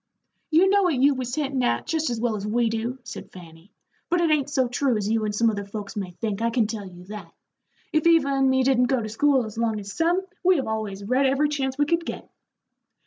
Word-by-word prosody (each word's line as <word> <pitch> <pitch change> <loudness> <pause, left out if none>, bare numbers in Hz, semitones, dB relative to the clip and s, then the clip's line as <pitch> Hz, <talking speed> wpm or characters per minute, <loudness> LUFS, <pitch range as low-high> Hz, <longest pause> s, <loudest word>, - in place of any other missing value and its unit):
"You 335 +4 +5
know 400 +1 +4
what 355 -6 +2
you 275 +3 +4
was 255 -2 -4
hintin' 275 -4 -1
at, 245 - 0
jest 320 -3 -1
as 235 -2 -2
well 230 -1 0
as 205 0 -4
we 230 +2 +1
do," 230 +3 -3
said 235 - -9
Fanny; 170 +1 -14 0.4
"but 350 - +2
it 335 -2 +2
ain't 290 -2 +1
so 260 -3 +1
true 245 0 0
as 205 -1 -2
you 220 0 +1
and 210 -1 -2
some 230 +2 +2
other 200 -1 -4
folks 200 +1 -7
may 195 -3 -3
think, 210 +3 -4
I 230 - +2
can 230 -1 +1
tell 210 -2 -5
you 180 -1 -12
that. 210 +3 -9 0.6
If 310 +1 +2
Eva 325 -4 +4
and 270 -1 +2
me 260 0 +3
didn't 255 -1 +3
go 255 +1 +1
to 215 - -5
school 270 +2 +2
as 220 +1 -7
long 225 -2 0
as 205 -1 -8
some, 350 +3 +1 0.2
we 370 0 +5
have 270 - -1
always 215 -3 -4
read 255 +6 +2
every 280 +3 +2
chance 265 -2 -2
we 290 - +3
could 335 +3 0
get." - - -7
245 Hz, 250 wpm, -24 LUFS, 215-285 Hz, 0.6 s, You